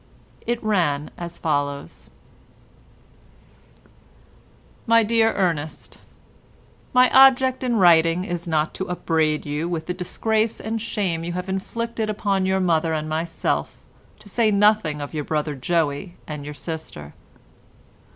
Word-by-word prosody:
It 240 0 -1
ran 165 -9 0
as 170 -1 -7
follows:— 145 -3 -3 2.8
"My 230 0 +5
dear 225 +1 +3
Ernest, 165 -5 -2 0.9
My 250 0 +6
object 265 -1 +5
in 245 -2 0
writing 170 -2 +5
is 175 -2 -5
not 155 -1 0
to 190 - -5
upbraid 160 -3 0
you 150 +3 -2
with 165 -2 -3
the 180 - -2
disgrace 215 +5 -1
and 225 +1 -3
shame 190 -7 -2
you 175 +1 -4
have 180 +1 -4
inflicted 225 +3 -3
upon 200 -2 0
your 190 0 +1
mother 165 -3 +1
and 155 0 -2
myself, 165 +1 -2 0.4
to - - -17
say 220 +2 +2
nothing 205 -7 +2
of 145 - -8
your 150 -1 -2
brother 150 0 -2
Joey, 155 +4 -1
and 150 -2 -7
your 150 0 -7
sister. 150 - -7
175 Hz, 130 wpm, -23 LUFS, 155-215 Hz, 2.8 s, My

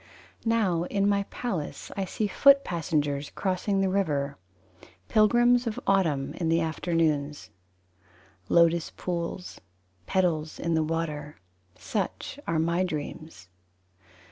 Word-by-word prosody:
Now 195 -7 +2
in 200 +2 0
my 200 -1 +2
palace 185 -12 -4
I 195 -1 -1
see 210 +4 -2
foot 275 +7 +5
passengers 150 -4 -1
Crossing 195 +1 0
the 195 - +2
river: 150 -8 0 0.7
Pilgrims 240 +3 +4
of 220 - -2
Autumn 165 -9 +1
In 165 -2 -1
the 165 +1 +3
afternoons. 160 -4 -1 1.0
Lotus 170 -1 +4
pools: 175 0 -4 0.5
Petals 165 -4 0
in 170 0 -1
the 160 - +3
water. 155 -2 -3 0.4
Such - - -4
are 165 - +1
my 170 +3 +1
dreams. 155 - -6
170 Hz, 115 wpm, -27 LUFS, 155-195 Hz, 1.0 s, foot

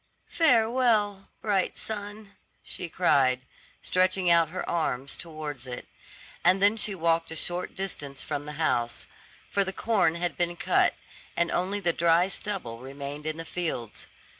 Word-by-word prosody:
"Farewell 225 - +3
bright 200 -4 +1
sun," 205 -1 -3 0.3
she 175 - -3
cried, 130 -8 +3 0.4
stretching 185 -1 +2
out 165 -2 +5
her 185 +3 -4
arm 140 -6 0
towards 150 -3 -6
it; 125 -1 -6 0.6
and 185 +2 +5
then 205 +2 +5
she 210 -2 0
walked 165 -1 +1
a 160 - -6
short 175 +2 -3
distance 145 -8 -5
from 145 +1 -4
the 150 - -5
house; 120 -7 0 0.5
for 200 - +3
the 190 - -3
corn 195 -5 +2
had 175 0 -2
been 175 0 0
cut, - - +2 0.4
and 170 - +2
only 190 +3 0
the 175 -4 +1
dry 170 +3 +4
stubble 185 - -4
remained 140 +3 -7
in 155 0 -2
the 165 - -6
fields. 160 -11 -4
175 Hz, 150 wpm, -28 LUFS, 150-195 Hz, 0.6 s, out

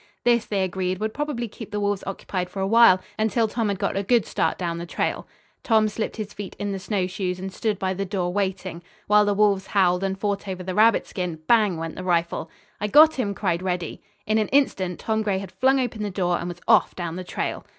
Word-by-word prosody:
This, 235 -2 +3
they 200 -2 0
agreed, 185 0 -2
would 215 +2 -3
probably 290 -6 -3
keep 220 0 -10
the 210 -1 -3
wolves 205 -1 -1
occupied 185 -2 -4
for 195 - -7
awhile, 195 -1 +6 0.2
until 220 +1 +2
Tom 225 0 -1
had 200 - -1
got - - -1
a 195 - +1
good 230 +2 +2
start - - 0
down 170 -2 -3
the 170 - -6
trail. - - -2 0.3
Tom 220 -2 +3
slipped 215 +1 -3
his 210 -2 -5
feet 205 -2 -7
in 205 0 -3
the 195 - -3
snowshoes 185 -2 -2
and 190 +1 -6
stood 215 -1 -1
by 190 0 -1
the 195 +1 -3
door 185 -2 -2
waiting. 190 -3 -2 0.2
While 210 0 +5
the 205 0 +1
wolves 200 -2 +2
howled 180 -2 +2
and 195 0 -1
fought 200 0 -2
over 185 -1 -4
the 185 0 -4
rabbit 220 +3 +4
skin, 180 -3 -4
bang 210 -3 +3
went 165 0 -5
the 185 - -6
rifle. 170 -2 0 0.3
"I 210 - -1
got 310 +7 +7
him!" 200 -5 -1
cried 180 -3 -1
Reddy. 180 -3 -3 0.2
In 215 +1 +2
an 215 - 0
instant 190 -10 +1
Tom 220 -1 0
Gray 205 -3 0
had 190 -1 -6
flung 265 +8 +2
open 240 -4 -2
the 210 - -2
door 180 -2 0
and - - -4
was 175 0 -8
off 225 -2 +4
down 170 -2 -4
the 185 - -5
trail. - - -4
195 Hz, 235 wpm, -24 LUFS, 185-215 Hz, 0.3 s, got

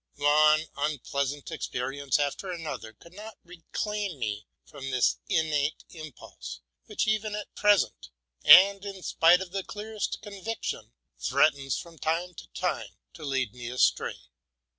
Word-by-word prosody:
One 150 +2 +4
unpleasant 140 -1 -2
experience 135 +2 -2
after 145 +6 -2
another 160 -10 -6
could 170 +10 -18
not 215 +3 -10
reclaim 185 +2 -4
me 105 -3 -4 0.2
from 135 -2 -8
this 130 -2 +2
innate 155 -5 0
impulse, 130 - -9 0.3
which, - - -1
even 215 -1 0
at 210 - -7
present, 200 - +2 0.3
and 195 +1 +8
in 195 -2 -7
spite 175 +3 +5
of 185 -2 -6
the 195 0 -3
clearest 210 +1 -4
convic 210 +2 -6
tion, - - -4 0.3
threatens 140 - +2
from 165 -2 -10
time 170 +4 -1
to - - -11
time 115 - -3 0.2
to 160 - -11
lead 130 -6 -1
me 120 -1 -7
astray. 125 +1 +1
155 Hz, 140 wpm, -28 LUFS, 135-190 Hz, 0.3 s, and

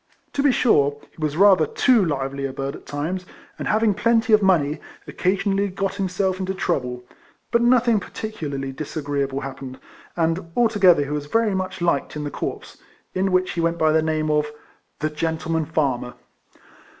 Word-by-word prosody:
To 280 - 0
be 285 -1 +4
sure, 145 - +3
he - - -30
was 155 0 -1
rather 190 -5 +6
too 240 - +3
lively 140 -3 -2
a - - -6
bird 135 +1 -4
at - - -14
times, 160 +6 -3 0.4
and, - - -3
having 215 -1 +3
.plenty 225 +2 +2
of 215 - +6
money, 160 -6 +2 0.3
occasionally 195 +2 0
got 195 0 -2
himself 190 0 -1
into 190 0 -2
trouble, 125 -8 -2 0.5
but 235 - +3
nothing 240 -2 +4
par - - -10
ticularly 145 -11 -5
disagreeable 140 -2 -3
happened, 135 -1 -7 0.4
and 165 0 -1
alto 225 -3 +2
gether 180 -6 +6
he 140 - -6
was 150 -1 -3
very 225 +4 +1
much 185 -1 -3
liked 170 -5 0
in 150 - -4
the 145 - -4
corps, - - -5 0.4
in 190 +1 0
which 185 0 +2
he 170 - -2
went 165 0 0
by 155 -1 +3
the 160 0 +3
name 155 -1 0
of 150 0 +1 0.3
" - - -42
The 155 0 0
Gentleman 160 +1 -1
Farmer." 135 -6 -1
165 Hz, 180 wpm, -22 LUFS, 145-195 Hz, 0.5 s, rather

